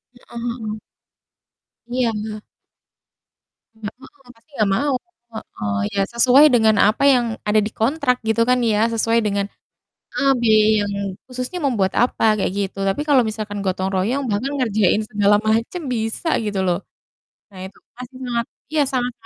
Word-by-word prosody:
Heeh 240 -1 -11
heeh. 230 -3 -4 1.1
Iya, 245 -1 0
heeh. 215 0 -5 1.3
Nggak 220 0 -7
heeh, 270 -1 -18
pasti 230 +7 -29
nggak 215 -4 +1
mau. 280 +3 0 0.4
Heeh, 105 - -5 0.2
iya 195 - 0
sesuai 255 +5 +6
dengan 220 -2 +4
apa 215 +6 0
yang 245 -1 +2 0.2
ada 210 +1 +4
di - - -9
kontrak 255 +2 +1
gitu 225 +1 +2
kan 250 - +4
ya, 210 - +1
sesuai 230 +1 +2
dengan 200 -1 0 0.7
a - - 0 0.2
be 235 - +1 0.3
yang 205 0 -2 0.4
khususnya 255 +8 -5
membuat 205 -8 +1
apa 245 - 0 0.2
kayak 185 - 0
gitu. 200 -1 -3
Tapi 195 +9 -1
kalau 275 -4 +5
misalkan 215 -1 -5
gotong 190 0 -1
royong, 225 +10 0
bahkan 230 +7 -1
ngerjain 215 -4 +2
segala 205 0 +3
macam 230 +11 0
bisa 225 +9 -3 0.2
gitu 205 -2 -2
loh. 175 -1 +1 0.7
Nah 190 -2 -12
itu 190 - -15 0.2
pasti 250 +1 -10
sangat 235 -1 -1 0.3
iya 310 -1 +3
sangat 250 -1 -1
225 Hz, 155 wpm, -20 LUFS, 205-250 Hz, 1.3 s, sesuai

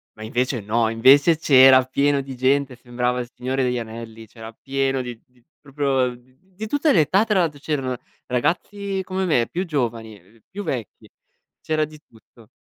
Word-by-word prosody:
ma 110 - -10
invece 120 +2 -1
no. 110 +3 0
Invece 135 +8 +5
c'era 130 -3 +7
pieno 140 +2 +1
di 135 -1 -8
gente, 135 +1 +1
sembrava 125 0 -2
il 120 - -8
Signore 130 +2 -2
degli 125 -1 0
anelli; 115 0 -9
c'era 115 +1 -11
pieno 135 +2 -2
di 120 -2 -7
di 125 -1 -30 0.2
proprio 140 -2 -1
uhm, - - -11 0.3
di 190 +3 -9
tutte 290 +5 +1
le 165 - +5
età, 185 +8 +2
tra 210 -4 +1
l'altro; 155 -5 -1
c'erano 135 -4 -3 0.3
ragazzi 190 +9 -2
come 190 +1 -3
me, 125 -10 +2
più 180 +2 -3
giovani, 115 - -3
ehm, 100 +6 -25
più 205 +1 -6
vecchi, 120 - -6 0.5
c'era 155 -1 -1
di 155 0 -14
tutto. 115 0 -21
130 Hz, 175 wpm, -22 LUFS, 120-155 Hz, 0.5 s, c'era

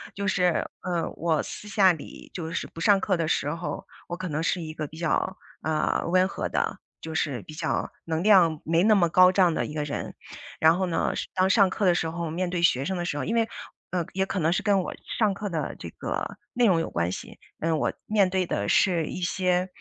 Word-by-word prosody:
就 200 - -3
是， 180 -3 +1 0.2
嗯， 170 -2 -1
我 160 -2 +1
私 210 - -8
下 200 -3 +5
里 160 -4 -9
就 165 -3 -4
是 - - -2
不 165 - -12
上 200 +4 +5
课 185 -3 +1
的 165 - -1
时 145 - 0
候， 170 +1 -5 0.2
我 175 - -4
可 185 0 -5
能 150 +1 -2
是 170 +2 0
一 155 -1 -6
个 155 -2 -4
比 160 - -13
较， 175 +3 0 0.3
呃， 155 -1 0
温 185 +2 +4
和 - - -3
的， - - -1 0.2
就 160 - -6
是 140 -6 -1
比 155 - -11
较 155 - -2
能 165 +1 -1
量 175 -7 +5
没 165 +3 +2
那 215 0 +5
么 170 -4 +3
高 185 +2 +7
涨 180 -3 +4
的 - - -1
一 150 - -7
个 150 -1 -2
人。 145 - -5 0.5
然 160 +2 +6
后 190 - +1
呢， 170 - 0
上 - - -3
当 185 +1 +3
上 195 -1 +5
课 200 +1 -1
的 180 - +5
时 165 -1 -1
候 165 -1 -4
面 180 +2 -1
对 175 -1 -2
学 135 -6 +3
生 190 - -1
的 175 - -2
时 165 -4 -2
候， - - -2
因 230 - -1
为 225 0 +2 0.4
呃， 175 -2 -1
也 190 0 +1
可 195 - -3
能 165 0 +2
是 - - -1
跟 200 -2 +3
我 - - -5 0.3
上 210 -3 +3
课 205 +1 -4
的 165 -3 -3
这 - - -7
个 - - -4 0.2
内 245 - +3
容 180 -6 +4
有 165 - -2
关 85 +1 -1
系， - - -8 0.2
嗯， 165 0 +1
我 - - 0
面 205 -3 +3
对 185 -1 0
的 100 -10 -2
是 170 -4 +3
一 185 - -5
些 180 +1 +1
175 Hz, 260 characters per minute, -26 LUFS, 160-190 Hz, 0.5 s, 高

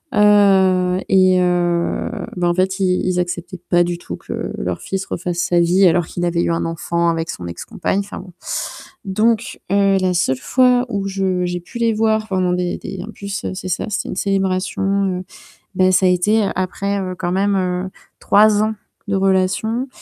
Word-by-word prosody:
Heu 190 -3 +4
et 185 -1 +5
heu, 175 -1 0 0.3
bah, 175 -1 +1
en 175 - +2
fait, 190 +1 0
ils 185 -1 +1
ils 180 -1 0
acceptaient 175 +1 -4
pas 175 -1 +4
du 175 0 -2
tout 175 - -7
que - - -6
leur - - -3
fils 190 0 -4
refasse 175 -1 -4
sa 175 0 +2
vie 180 +3 +4
alors 175 0 +2
qu'il 175 - -5
avait 170 -1 +1
eu - - 0
un 165 - -1
enfant 170 +1 -1
avec 165 -1 -2
son 90 - -6
ex 85 0 -7
compagne, 195 - -2
enfin 200 - -6
bon. 185 -1 -11 0.7
Donc 215 +3 0
heu, 200 -1 +3
la 185 -1 +1
seule 130 -7 +1
fois 250 - +3
où 200 -3 -2
je 190 -2 -1
j'ai 175 0 -2
pu 205 +8 -10
les 230 -1 +2
voir 220 0 +1
pendant 185 -2 +1
des 180 0 -1
des, 185 -1 -7
en - - -8
plus, 200 -1 -6
c'est 185 0 -6
ça, 180 - -1
c'était 210 +2 -2
une - - -4
célébration, 190 -1 -1 0.4
heu, - - -10 0.5
bah, 185 0 +4
ça 185 +1 +3
a - - +4
été 205 +5 +2
après 200 +2 -2 0.2
quand 175 -1 -2
même, 200 +1 +1
heu, 180 0 -1 0.3
3 210 0 +4
ans 220 - 0 0.4
de 200 - +1
relation 195 +6 +1
185 Hz, 190 wpm, -19 LUFS, 175-200 Hz, 0.7 s, et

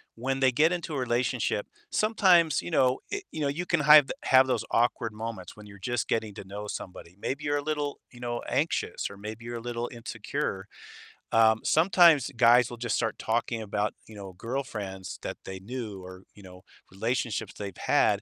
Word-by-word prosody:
when 135 +3 -2
they 130 -1 +5
get 155 +7 +3
into 170 -3 -4
a - - -1
relationship, 120 -3 0 0.3
sometimes, 180 - +4
you 85 - -6
know, 130 0 +3
i 405 - -2
you 160 - -6
know, 140 - +1
you 165 +6 -2
can 175 -4 +1
hive 150 -1 +8
have 130 0 +5
those 115 -3 0
awkward 115 -1 +1
moments 110 -4 -6
when 105 -1 -13
you're 100 -1 -13
just 120 +1 -2
getting 110 -2 -1
to - - -7
know 100 +2 -7
somebody. 90 -3 -8
Maybe 140 +3 -3
you're 145 0 +1
a - - -1
little, 150 -2 -2
you 120 - -14
know, 120 -1 -3
anxious - - -1
or 100 - -10
maybe 110 +3 -8
you're 120 0 -5
a - - -7
little 120 0 -4
insecure. 115 -1 -4 0.7
Um, 110 -1 +4
sometimes 165 -5 +5
guys 120 +1 +5
will 120 - -7
just 115 -2 -1
start 110 -2 -1
talking 115 0 -1
about, 105 0 -2
you 110 - -12
know, 95 -2 -9
girlfriends 105 -4 -5
that - - -4
they 95 0 -6
knew 105 -2 -6
or, 95 +1 -11
you 100 - -15
know, 90 0 -13 0.3
relationships 115 +3 -2
they've 100 -3 -7
had - - +2
120 Hz, 195 wpm, -28 LUFS, 105-135 Hz, 0.7 s, hive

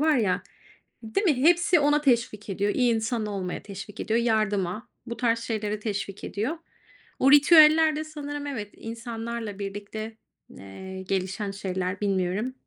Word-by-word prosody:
var 310 -1 +4
ya 205 -7 +1 0.6
Değil 225 - -1
mi, 310 -7 +4
hepsi 345 +2 +5
ona 295 +1 +3
teşvik 235 -6 +1
ediyor. 200 +1 0
İyi 245 -2 +3
insan 225 0 -1
olmaya 195 -3 -4
teşvik 200 0 -9
ediyor, 225 +1 +1
yardıma, 215 -3 0 0.2
bu 235 -1 -6
tarz 235 -2 +1
şeylere 215 -2 -3
teşvik 200 -2 -4
ediyor. 235 +11 -3 0.6
O 270 +1 +5
ritüeller 310 +1 +7
de 310 - -2
sanırım 290 -2 -6
evet, 215 -7 -4
insanlarla 230 -2 -6
birlikte, 205 +2 -6 0.4
eee, 190 - -8
gelişen 190 +2 -2
şeyler, 190 -1 -3
bilmiyorum. 195 +4 0
220 Hz, 140 wpm, -26 LUFS, 200-265 Hz, 0.6 s, ritüeller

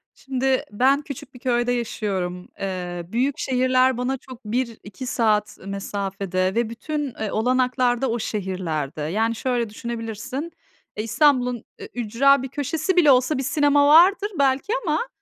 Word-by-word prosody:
Şimdi 265 0 0
ben 265 +7 +3
küçük 285 -2 -9
bir 250 - -13
köyde 245 -1 +1
yaşıyorum. 190 -6 -3
Eee, 180 -2 -4
büyük 255 +8 0
şehirler 255 0 +2
bana 255 +2 -1
çok, 255 -2 -13
1-2 230 0 -4
saat 215 -4 +1
mesafede 195 -1 -2
ve 235 -1 +1
bütün, 285 +3 -4
eee, 215 -2 -2
olanaklarda 250 +1 +1
o 235 +1 -1
şehirlerde. 180 -9 -3
Yani, 220 +9 0
şöyle, 240 -2 -1
düşünebilirsin, 235 +7 -5 0.5
eee, 215 - -1
İstanbul'un 250 0 +2 0.2
ü - - -8
ücra 245 +4 +3
bir - - -3
köşesi 310 +6 -1
bile 320 -5 +6
olsa 255 +3 +3
bir 265 - -2
sinema 290 +1 +3
vardır 375 +7 +6
belki 275 - +2
ama, 315 +9 0
245 Hz, 140 wpm, -23 LUFS, 210-270 Hz, 0.5 s, bile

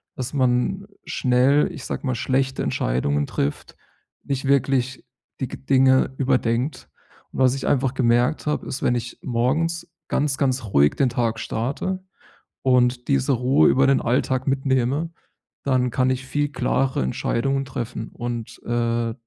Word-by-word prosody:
Dass 130 +1 -5
man 130 +9 +1 0.2
schnell, 130 +6 +2
ich 150 -6 -8
sage - - -4
mal, 130 - +1
schlechte 130 +2 0
Entscheidungen 70 +4 0
trifft, 70 +1 -3 0.5
nicht 140 -1 -3
wirklich 135 -1 +1 0.4
die 130 - 0
g - - -7
Dinge 130 0 +3
überdenkt. 125 - 0 0.4
Und - - -6
was 130 0 +4
ich 135 - -5
einfach 135 -1 +1
gemerkt 120 +3 +2
habe, 150 - -1
ist, 135 - -5
wenn 120 - +3
ich 120 0 -5
morgens 155 +8 0 0.2
ganz, 140 -2 0
ganz 130 -2 0
ruhig 75 -8 +4
den 135 - +2
Tag 115 -2 -1
starte 145 +11 -3 0.6
und 125 -1 +2
diese 135 0 +2
Ruhe 125 - +4
über 135 +1 +4
den 135 - +3
Alltag 130 +1 0
mitnehme, 135 +3 0 0.5
dann 130 -2 +1
kann 130 +1 +1
ich 130 0 -2
viel 145 +2 0
klarere 130 - 0
Entscheidungen 135 - -1
treffen 125 -3 -5
und, 120 -2 -5
äh, 115 -1 0
130 Hz, 145 wpm, -23 LUFS, 120-135 Hz, 0.6 s, was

